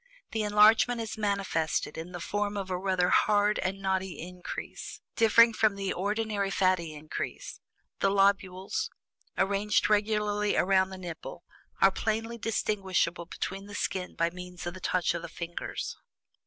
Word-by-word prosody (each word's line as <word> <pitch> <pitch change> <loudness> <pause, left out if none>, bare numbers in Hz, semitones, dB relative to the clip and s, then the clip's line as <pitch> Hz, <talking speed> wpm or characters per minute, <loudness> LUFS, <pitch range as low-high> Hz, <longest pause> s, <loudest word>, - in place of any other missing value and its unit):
The 220 - -1
enlargement 215 +3 +5
is 225 -1 -4
manifested 195 -8 -1
in 165 +2 -6
the 175 - -6
form 205 +3 -2
of 190 -1 -4
a - - +1
rather 185 -2 +1
hard 210 0 +3
and 190 +1 -2
knotty 190 -1 -1
increase, 180 +1 -7 0.2
differing 230 +1 +6
from 215 -2 +2
the 195 -1 -2
ordinary 205 +1 -1
fatty 185 -5 +1
increase; 150 +1 -6 0.4
the 195 - +3
lobules, 195 - +1 0.5
arranged 200 +2 +2
regularly 210 0 +1
around 190 0 +3
the 190 - -8
nipple, 175 -1 -8 0.4
are 195 - +7
plainly 225 +3 -2
distinguishable 190 -6 0
beneath 195 +2 -5
the 205 - -8
skin 185 -2 -2
by 170 0 +1
means 180 0 -8
of 175 - -3
the 185 - -9
touch 180 -2 +1
of 170 - -3
the 170 - -7
fingers. 170 +1 -5
195 Hz, 150 wpm, -29 LUFS, 180-210 Hz, 0.5 s, are